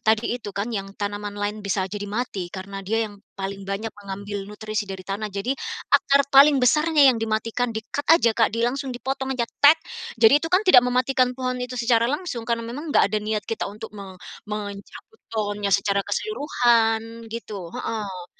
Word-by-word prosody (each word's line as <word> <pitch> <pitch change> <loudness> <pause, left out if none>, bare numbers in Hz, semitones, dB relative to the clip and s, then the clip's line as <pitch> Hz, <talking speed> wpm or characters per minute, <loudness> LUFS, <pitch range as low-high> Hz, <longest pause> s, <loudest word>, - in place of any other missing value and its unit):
tadi 220 +1 +2
itu 210 - -7
kan 215 +4 -2
yang 195 -2 -5
tanaman 205 0 -4
lain 205 +1 -3
bisa 200 -1 -1
jadi 205 -1 -4
mati 205 -5 -3
karena 195 +2 -7
dia 225 +4 0
yang 205 -1 -13 0.2
paling 195 0 -5
banyak 210 +2 -3
mengambil 200 0 -6
nutrisi 215 0 -4
dari 190 -1 -7
tanah 200 +2 -3
jadi, 200 +5 -2 0.4
akar 280 0 +5
paling 280 +1 +8
besarnya 300 +4 +4
yang 250 -4 +5
dimatikan 225 +2 -1
di-cut 225 +6 -5
aja, 320 -8 +6
Kak, 225 0 +3
di 230 +2 -1
langsung 270 +3 -1
dipotong 265 +1 -3
aja, 235 - +1 0.2
"tek" 290 +3 +8 0.4
jadi 230 +6 +6
itu 325 - -3
kan 370 +4 +3
tidak 370 -11 +8
mematikan 250 0 +1
pohon 255 -1 -2
itu 250 0 -5
secara 235 -1 +2
langsung 265 -6 -4
karena 230 0 0
memang 270 +8 -6
enggak 290 - +4
ada 215 - +1
niat 210 -1 -2
kita 225 -2 -3
untuk 215 +2 -9
me 195 -2 -9 0.3
mencabut 210 - -7
pohonnya 205 -2 -2
secara 200 +1 +2
keseluruhan 230 - 0
gitu 210 -6 -6
heeh. 195 -5 -4
225 Hz, 180 wpm, -24 LUFS, 205-250 Hz, 0.4 s, paling